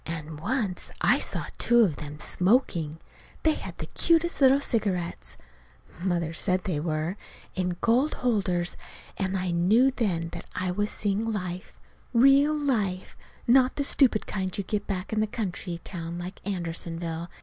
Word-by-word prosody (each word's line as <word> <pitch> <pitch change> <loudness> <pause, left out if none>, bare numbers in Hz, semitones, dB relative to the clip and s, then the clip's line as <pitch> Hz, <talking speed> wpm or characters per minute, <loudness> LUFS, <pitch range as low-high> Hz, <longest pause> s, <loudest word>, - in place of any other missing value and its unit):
And 160 -2 -5
once 200 - -1
I - - +4
saw - - -2
two 240 0 +5
of 180 -10 +3
them 150 0 -7
smoking. 180 - +1 0.5
They 315 - +4
had - - -7
the - - -5
cutest 335 -1 +2
little 270 +1 +7
cigarettes 200 -10 -2 0.6
(Mother 170 -3 -1
said 185 +3 +1
they 175 -7 -1
were) 155 +4 -2 0.4
in 180 -2 -1
gold 250 +6 +3
holders, 190 -8 0 0.4
and 190 -1 -1
I 180 -1 -1
knew 210 +10 +4
then 180 -10 -1
that 170 0 -9
I 180 0 -1
was 205 +3 0
seeing 205 +1 -1
life 185 -3 -5 0.3
real 275 +5 +6
life; 215 -11 -1 0.3
not 255 +1 +5
the 285 - 0
stupid 260 -5 +3
kind 185 -2 -3
you 200 - -1
get 205 +2 -2
back 190 +1 -3
in 215 - +2
a 215 - +1
country 185 -5 -4
town 170 -2 -6
like 180 +2 -7
Andersonville. 170 -2 -4
185 Hz, 155 wpm, -27 LUFS, 170-230 Hz, 0.6 s, little